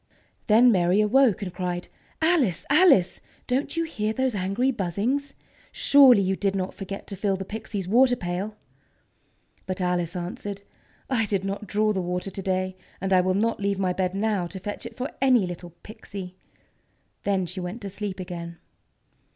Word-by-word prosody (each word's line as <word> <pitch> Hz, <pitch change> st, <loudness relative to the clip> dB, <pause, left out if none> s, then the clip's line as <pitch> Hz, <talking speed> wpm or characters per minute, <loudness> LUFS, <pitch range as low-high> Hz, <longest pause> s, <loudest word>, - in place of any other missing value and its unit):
Then 235 Hz, +3 st, +6 dB
Mary 180 Hz, 0 st, +3 dB
awoke, 215 Hz, 0 st, +4 dB
and 180 Hz, -2 st, -5 dB
cried: 180 Hz, -1 st, -3 dB, 0.4 s
"Alice! 295 Hz, -, +2 dB
Alice! 290 Hz, -, +5 dB, 0.2 s
Don't 265 Hz, +6 st, -1 dB
you 330 Hz, -, +2 dB
hear 220 Hz, -10 st, -2 dB
those 260 Hz, +1 st, 0 dB
angry 200 Hz, +7 st, 0 dB
buzzings? 240 Hz, -, -2 dB, 0.4 s
Surely 275 Hz, -, +6 dB
you 190 Hz, +1 st, +1 dB
did 195 Hz, 0 st, -1 dB
not 185 Hz, -1 st, -2 dB
forget 195 Hz, 0 st, -7 dB
to 200 Hz, -, -7 dB
fill 195 Hz, 0 st, 0 dB
the 190 Hz, 0 st, -5 dB
Pixies' 210 Hz, -2 st, -5 dB
water 245 Hz, +5 st, +4 dB
pail!" 190 Hz, +1 st, -4 dB, 1.1 s
But 185 Hz, +1 st, -3 dB
Alice 180 Hz, -1 st, -1 dB
answered: 195 Hz, +3 st, -5 dB, 0.4 s
"I 225 Hz, -5 st, +1 dB
did 195 Hz, -2 st, -1 dB
not 200 Hz, +2 st, -4 dB
draw 215 Hz, +2 st, +1 dB
the 190 Hz, -, -1 dB
water 180 Hz, +2 st, -3 dB
to 195 Hz, -, -6 dB
day. 185 Hz, 0 st, -1 dB, 0.2 s
And 195 Hz, +1 st, 0 dB
I 185 Hz, -, +6 dB
will 185 Hz, +1 st, +1 dB
not 225 Hz, +3 st, +1 dB
leave 200 Hz, -1 st, 0 dB
my 185 Hz, -2 st, 0 dB
bed 185 Hz, 0 st, -1 dB
now 200 Hz, -3 st, 0 dB
to 190 Hz, +3 st, -8 dB
fetch 205 Hz, +4 st, -5 dB
it 225 Hz, -, -13 dB
for 255 Hz, +2 st, -3 dB
any 255 Hz, -6 st, +4 dB
little 175 Hz, -1 st, -8 dB
Pixy!" 200 Hz, -4 st, -8 dB, 0.9 s
Then 195 Hz, -2 st, +1 dB
she 180 Hz, +2 st, -6 dB
went 180 Hz, +6 st, -5 dB
to 200 Hz, -, -4 dB
sleep 200 Hz, 0 st, -5 dB
again. 170 Hz, -2 st, -6 dB
195 Hz, 175 wpm, -25 LUFS, 185-225 Hz, 1.1 s, Then